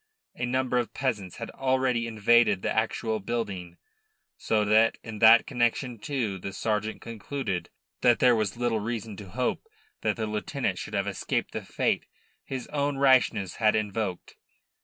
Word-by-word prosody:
A 120 - -2
number 125 0 +1
of 120 - -4
peasants 110 -10 -2
had - - -6
already 130 -3 0
invaded 110 -2 +3
the - - -1
actual 110 0 0
building, 100 -6 -4 0.6
so 105 -1 0
that 110 +2 +4
in 110 -2 -7
that 115 +1 +8
connection 120 -2 0
too 110 -6 -2
the 95 +2 -6
sergeant 110 +1 -2
concluded 115 -3 -4 0.3
that 120 -2 +5
there 125 -1 +5
was 110 -2 -1
little 120 -2 0
reason 110 -1 -4
to 100 -3 -9
hope 125 - -2 0.3
that - - +1
the 110 - -2
lieutenant 105 0 -2
should - - -6
have - - +1
escaped - - -2
the - - -4
fate - - -1 0.4
his 130 -2 -5
own 145 -1 -1
rashness 130 -8 +3
had 110 -2 +3
invoked. 105 -3 -3
115 Hz, 160 wpm, -27 LUFS, 105-125 Hz, 0.6 s, that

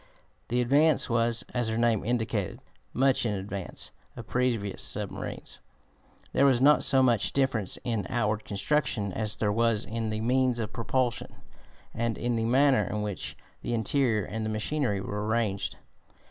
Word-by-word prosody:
The 125 +1 +1
Advance 140 +2 +3
was, 115 0 +2
as 120 -2 0
her 110 0 -1
name 115 -3 +2
indicated, 110 -5 -2 0.3
much 135 +1 +2
in 105 -3 0
advance 95 -1 -6 0.2
of 115 - -8
previous 115 -5 -1
submarines. - - -4 0.7
There 140 - +4
was 130 -3 +4
not 145 +3 +5
so 135 -1 +5
much 120 -5 +2
difference 130 -8 0
in 115 -6 -2
outward 110 -2 0
construction 105 -2 -1
as 105 0 -2
there 105 -2 0
was 115 -1 +1
in 115 0 -3
the 110 0 -2
means 125 +1 +2
of 110 -2 -4
propulsion 120 +1 -1 0.6
and 115 0 -1
in 120 0 -1
the 115 0 0
manner 130 -2 +4
in 105 +1 -2
which 105 -3 -4 0.2
the 120 - -2
interior 115 -2 +1
and 110 +1 -4
the 110 - -2
machinery 110 0 -1
were 105 +2 -4
arranged. 110 -3 -1
115 Hz, 160 wpm, -28 LUFS, 105-125 Hz, 0.7 s, not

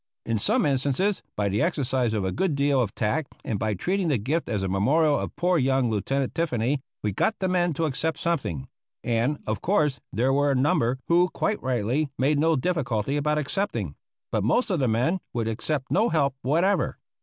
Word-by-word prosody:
In 115 -2 0
some - - +2
instances, 145 +8 +1
by 105 -1 0
the 100 +3 0
exercise 130 -8 0
of 100 -3 -1
a 95 - 0
good 180 - 0
deal 140 -1 +2
of 105 -5 -2
tact 120 +7 -1
and 105 - -2
by 110 -1 0
treating 185 - -1
the 145 -5 +2
gift 140 +10 -2
as 105 -4 -1
a - - 0
memorial 140 - +2
of - - -5
poor 180 -1 +2
young 130 -2 +2
Lieutenant 135 +6 -1
Tiffany, 135 -4 0 0.2
we 105 - 0
got 220 - 0
the 190 - -1
men 175 -1 +2
to 160 +3 -1
accept 155 +2 -1
something; 125 - -2 0.4
and, 120 +5 +1
of 110 -2 -2
course, 155 -7 +1
there 130 +4 +1
were 145 +1 +2
a 140 - +2
number 130 -2 +2
who, 175 +2 +4
quite 210 +3 -1
rightly, 130 +4 0
made 140 +3 +2
no 160 +1 +3
difficulty 135 - -1
about 150 +1 +1
accepting. 140 - -2 0.4
But 110 -3 0
most 200 - +2
of 180 - +1
the 130 - +2
men 125 +12 +1 0.2
would 115 -2 -1
accept 130 +5 -2
no 220 +5 +3
help 140 -4 +1
whatever. 170 +9 +1
140 Hz, 200 wpm, -25 LUFS, 115-165 Hz, 0.4 s, who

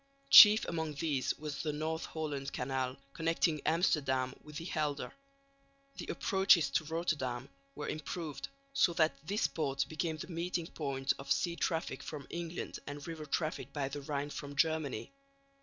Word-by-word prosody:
Chief 215 +1 +11
among 160 -3 -3
these 145 -3 0
was 150 -2 -5
the 155 - -1
North 160 +2 -2
Holland 145 -4 -4
Canal, 130 0 -2 0.2
connecting 165 -1 +1
Amsterdam 135 -6 +2
with 150 0 -13
the 165 - -5
Helder. 150 -5 -2 0.8
The - - -6
approaches 190 -7 +4
to 155 - +1
Rotterdam 145 -6 -2 0.3
were 150 - -5
improved, 155 0 -4 0.3
so 275 -11 +4
that 160 -1 +3
this 205 +3 +1
port 140 -4 0
became 160 0 -2
the - - -6
meeting 170 0 -2
point 140 -4 -1
of 135 0 -6
sea 170 -1 +2
traffic 165 -1 -1
from 150 -3 -7
England 170 0 -5
and 145 0 -6
river 160 -2 -6
traffic 155 +2 -2
by 140 -2 -1
the 145 +1 -5
Rhine 145 +1 -3
from 145 -1 -6
Germany. 160 - 0
155 Hz, 155 wpm, -33 LUFS, 140-165 Hz, 0.8 s, Chief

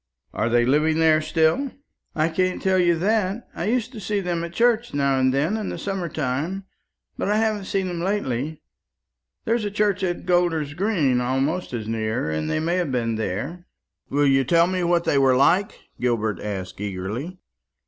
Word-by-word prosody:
"Are 115 - 0
they 120 0 +3
living 155 +4 +2
there 160 -1 +4
still?" 160 - +1 0.4
"I 155 0 +2
can't 185 +2 0
tell 190 -1 +2
you 175 -1 +4
that. 205 +3 0
I 170 - -4
used 240 +2 0
to 235 - -8
see 205 +1 -1
them 175 -3 -2
at 170 - -5
church 235 +1 +1
now 140 -1 +2
and 130 0 +3
then 150 +10 +1
in 215 - -3
the - - -5
summer 195 -4 -3
time; 155 +7 -2 0.5
but - - -1
I 210 - +2
haven't 215 -2 0
seen 195 0 -1
them 175 -2 -4
lately. 155 - -2 0.8
There's 230 0 +1
a 205 - -1
church 205 -1 0
at 175 -1 -2
Golder's 175 -5 +1
green 160 - +1
almost 135 +8 -1
as 115 -4 -4
near, 110 -5 -1
and 80 0 -2
they 155 - 0
may 170 +3 0
have 175 -6 -1
been 115 -3 0
there." 110 - -4 0.4
"Will 145 +1 +2
you 135 -1 +4
tell 170 +5 +4
me 185 0 -1
what 170 0 +2
they 140 - +2
were 135 -1 +4
like?" 175 +9 +3 0.2
Gilbert 110 -5 0
asked 95 -2 -5
eagerly. 105 - -4
165 Hz, 190 wpm, -23 LUFS, 130-190 Hz, 0.8 s, there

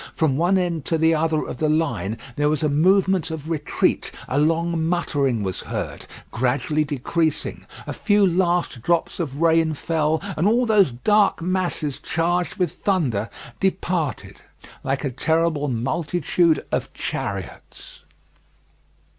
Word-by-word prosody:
From 155 -5 +1
one 175 +6 +2
end 170 -4 -1
to 165 - +1
the 160 +1 +3
other 160 -1 +1
of - - -6
the 155 +2 +1
line 145 - 0 0.2
there 145 0 +2
was 155 0 0
a 150 - +2
movement 185 +3 +3
of 160 0 -6
retreat: 150 -3 0 0.2
a 135 - 0
long 165 +2 +1
muttering 145 -9 0
was 95 -2 -3
heard, - - -5 0.2
gradually 135 +5 0
decreasing, 150 +3 -2 0.2
a - - -4
few 205 -2 +3
last 175 -7 +1
drops 170 +7 0
of 145 -4 -3
rain 165 -1 +3
fell, 160 0 0 0.2
and 165 +6 +1
all 240 +4 +3
those 210 -7 +4
dark 205 - +2
masses 175 -5 -1
charged 175 +2 -1
with 180 -7 0
thunder, 135 - -1 0.3
departed 175 - -2 0.4
like 135 +2 -1
a 135 - -1
terrible 160 +2 +1
multitude 160 +6 0
of - - -2
chariots. 95 -2 -6
160 Hz, 140 wpm, -22 LUFS, 145-175 Hz, 0.4 s, those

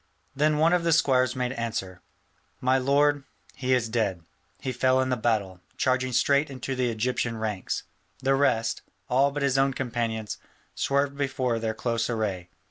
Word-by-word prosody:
Then 150 +2 +2
one 160 +3 +4
of 180 -1 +2
the 170 -1 +3
squires 130 -5 +3
made 125 -1 -1
answer, 110 -7 -4 0.6
"My 130 +1 +2
lord, 145 +2 +2 0.3
he 130 0 -3
is 120 -2 0
dead: 105 -7 -1 0.4
he 130 - -3
fell 130 +1 +2
in 130 0 +1
the 125 - +2
battle, 105 -6 -1 0.2
charging 130 0 +1
straight 140 +4 +3
into 135 0 -4
the 125 -1 +1
Egyptian 115 0 -1
ranks: 105 -4 -3 0.3
the 135 0 +1
rest, 115 -5 +1 0.3
all 135 +3 +4
but 145 0 -3
his 135 -1 +2
own 135 0 +3
companions, 115 -4 -3 0.3
swerved 140 0 0
before 130 -4 -1
their 110 -1 -2
close 115 0 -1
array. 100 -6 -2
125 Hz, 165 wpm, -26 LUFS, 115-135 Hz, 0.6 s, one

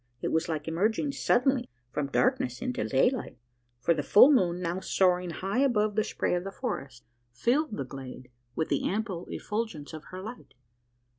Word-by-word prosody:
It - - 0
was 160 +1 0
like 155 -2 -3
emerging 215 - +1
suddenly 265 -1 +2 0.2
from 145 +1 -1
darkness 260 - +1
into 255 0 -2
daylight: 255 -1 +1 0.4
for 135 +8 +3
the 155 - -1
full 210 - +7
moon, 180 -10 +3
now 175 +1 -2
soaring 180 -2 +2
high 195 +7 -2
above 215 -6 +2
the 215 +1 +2
spray - - -1
of 175 0 0
the 195 - -5
forest, 140 - -5 0.3
filled 240 - 0
the 135 - -3
glade 130 -1 -9 0.2
with 160 - -1
the - - +1
ample 195 -4 -3
effulgence 210 -9 -4
of 155 -1 -8
her 185 - -8
light. 220 - -9
190 Hz, 170 wpm, -29 LUFS, 160-240 Hz, 0.4 s, full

